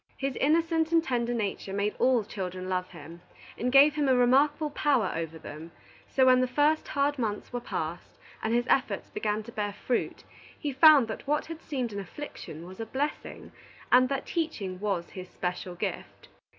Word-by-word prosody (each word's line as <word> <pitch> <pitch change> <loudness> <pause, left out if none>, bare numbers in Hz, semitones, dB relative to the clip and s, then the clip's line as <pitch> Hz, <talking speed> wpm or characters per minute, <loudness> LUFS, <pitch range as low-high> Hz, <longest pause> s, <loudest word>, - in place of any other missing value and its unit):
His 275 -1 -2
innocent 325 +2 +2
and 330 -1 +4
tender 240 -4 -1
nature 205 -4 -3
made 205 +1 -1
all 250 -3 +3
children 185 -2 -5
love 185 -1 -1
him, 170 0 -11 0.3
and 250 +1 -1
gave 280 +3 +7
him 295 -2 0
a 260 - +5
remarkable 285 +5 +3
power 275 -9 +1
over 165 -1 -4
them; 160 +1 -9 0.4
so 265 - +3
when 255 0 +6
the 255 - +2
first 295 +4 +2
hard 285 0 0
months 215 0 -3
were 245 - -1
past, 165 -7 -5 0.2
and 220 - -1
his 240 +1 +2
efforts 240 -7 0
began 215 0 -2
to 235 - -10
bear 205 -2 -3
fruit, 245 +4 -2 0.4
he 295 - -2
found 280 -2 +7
that 220 +4 -7
what 300 +1 +1
had 330 0 -8
seemed 255 -7 -3
an 200 - -4
affliction 195 - -8
was 185 +3 -11
a 225 - -3
blessing, 285 +6 -4 0.4
and 255 0 +6
that 275 -1 -2
teaching 220 - -3
was 195 -4 -2
his 185 -1 -8
special 180 0 -4
gift. - - -5
245 Hz, 185 wpm, -28 LUFS, 195-285 Hz, 0.4 s, gave